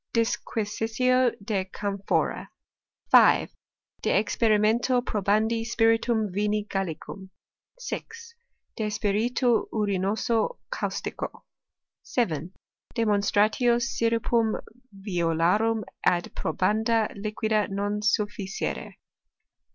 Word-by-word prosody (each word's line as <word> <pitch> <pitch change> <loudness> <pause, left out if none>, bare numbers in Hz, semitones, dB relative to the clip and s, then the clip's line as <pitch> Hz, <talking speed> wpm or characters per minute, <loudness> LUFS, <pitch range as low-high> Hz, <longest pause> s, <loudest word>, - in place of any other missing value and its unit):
Disquisitio 230 +2 +1
de 200 -3 -1
camphora. 200 +1 -2 0.6
5. - - +6 0.5
De - - -1
experimento 225 +3 +2
probandi 215 +1 +1
spiritum 225 -2 +2
vini 210 +2 0
Gallicum. 190 0 -5 0.5
6. 465 -2 -7 0.4
De 215 -1 -1
spiritu 225 +4 +1
urinoso 215 - 0
caustico. - - -4 0.6
7. 170 - -1 0.5
Demonstratio 215 +2 +2
syrupum 230 -1 +1 0.4
violarum 195 +3 +1 0.2
ad 175 -1 +1
probanda 220 +6 +1
liquida 215 +1 -1
non 205 +1 -2
sufficere. 210 -2 -2
215 Hz, 75 wpm, -26 LUFS, 200-230 Hz, 0.6 s, 5